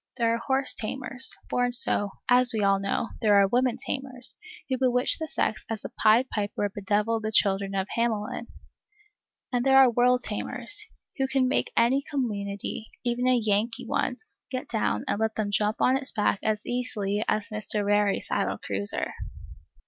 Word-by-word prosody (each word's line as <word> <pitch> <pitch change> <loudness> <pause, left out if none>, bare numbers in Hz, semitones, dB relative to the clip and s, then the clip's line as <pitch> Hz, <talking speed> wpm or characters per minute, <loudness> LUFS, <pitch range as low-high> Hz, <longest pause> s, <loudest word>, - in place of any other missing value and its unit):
There 230 -2 +2
are 230 - -1
horse 265 +2 +1
tamers, 260 +3 +2 0.2
born 245 0 0
so, 205 -4 +3 0.2
as 250 0 +6
we 215 - 0
all 195 0 +3
know; 195 +4 -2
there 210 -3 +4
are 200 -1 +5
woman 245 +3 +1
tamers, 260 -2 -3 0.3
who 260 -2 -2
bewitch 250 -1 +4
the 320 - -3
sex 220 - -1
as 220 -2 -4
the - - -5
pied 225 +4 +3
piper 205 -1 -2
bedeviled 210 +3 -1
the 215 0 -3
children 195 -2 +1
of 190 0 -1
Hamelin; 230 0 -2 1.1
and 245 -1 +1
there 270 0 +5
are 265 -2 +7
world 250 +1 +3
tamers, 235 - -2 0.3
who 270 -1 0
can 265 -1 +1
make - - 0
any 240 +4 +4
community, 215 -7 -4
even 245 +1 0
a 255 -1 +4
Yankee 215 +1 0
one, - - -1 0.3
get 255 -1 -4
down 215 - -1
and - - -1
let 220 0 -1
them 210 -2 -2
jump 210 +1 0
on 260 +1 +3
its 270 0 -4
back 205 -2 0
as 215 -1 -1
easily 210 -4 -2
as 215 -1 -1
Mr. 215 -1 -2
Rarey 205 0 +2
saddled - - -2
Cruiser. 100 +1 -3
230 Hz, 170 wpm, -26 LUFS, 205-250 Hz, 1.1 s, are